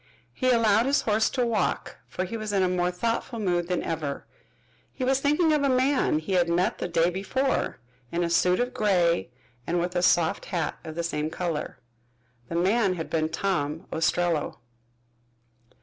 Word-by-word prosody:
He 255 - 0
allowed 230 -1 +4
his 280 - +3
horse 220 0 +2
to 250 -2 0
walk, 220 -5 -1
for 185 - -3
he 195 - -6
was 215 -2 -4
in 195 -2 +2
a - - +3
more 180 -1 +1
thoughtful 230 +6 -2
mood 175 -5 0
than 180 -1 -1
ever. 155 -4 -3 0.7
He 260 - -5
was 265 +1 +2
thinking 300 +3 +2
of 300 - +2
a 280 - +2
man 260 - +2
he 160 +5 -3
had 175 -2 +3
met 175 +2 +1
the - - -2
day 170 0 +2
before, 200 +9 -1 0.3
in 175 +1 0
a 170 - 0
suit 180 +1 +3
of 245 +1 -1
gray 175 -8 +2 0.4
and 175 +1 +1
with 175 +1 -2
a 175 - +2
soft 170 -2 +2
hat 170 -4 -3
of 155 - -7
the 170 - -2
same 155 -2 -2
color. 165 -2 -3 0.7
The - - -4
man 190 +2 +2
had 165 -2 -6
been 155 -1 0
Tom 165 -2 -2
Ostrello. 165 -1 0
180 Hz, 180 wpm, -26 LUFS, 170-230 Hz, 0.7 s, allowed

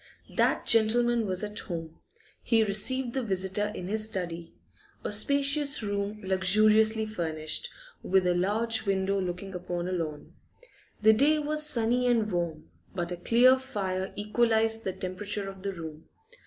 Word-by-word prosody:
That - - +1
gentleman 230 0 +3
was 185 +1 -1
at 210 0 -3
home; 165 -3 -7 0.4
he 225 -2 +3
received 235 +5 0
the 265 - -1
visitor 195 -1 -1
in 180 - -6
his 215 +2 -1
study 170 -5 -4 0.5
a - - -3
spacious 280 +5 +2
room 205 +1 -3
luxuriously 215 +4 +3
furnished, 165 - -3 0.3
with 190 0 +2
a 180 - +3
large 215 +5 0
window 195 0 0
looking 185 +2 -5
upon 175 -1 -4
a - - -3
lawn. 160 -5 -5 0.7
The 220 +1 +7
day 290 +7 +4
was 300 0 +2
sunny 245 -1 +1
and 225 -3 +1
warm, 170 -3 -3 0.2
but 175 -1 -3
a - - -2
clear 245 +8 +4
fire 195 -7 -3
equalised 225 +1 +1
the 190 - -2
temperature 200 +3 -4
of 195 -1 -9
the 200 +1 -3
room. 160 -3 -9
205 Hz, 150 wpm, -28 LUFS, 185-225 Hz, 0.7 s, The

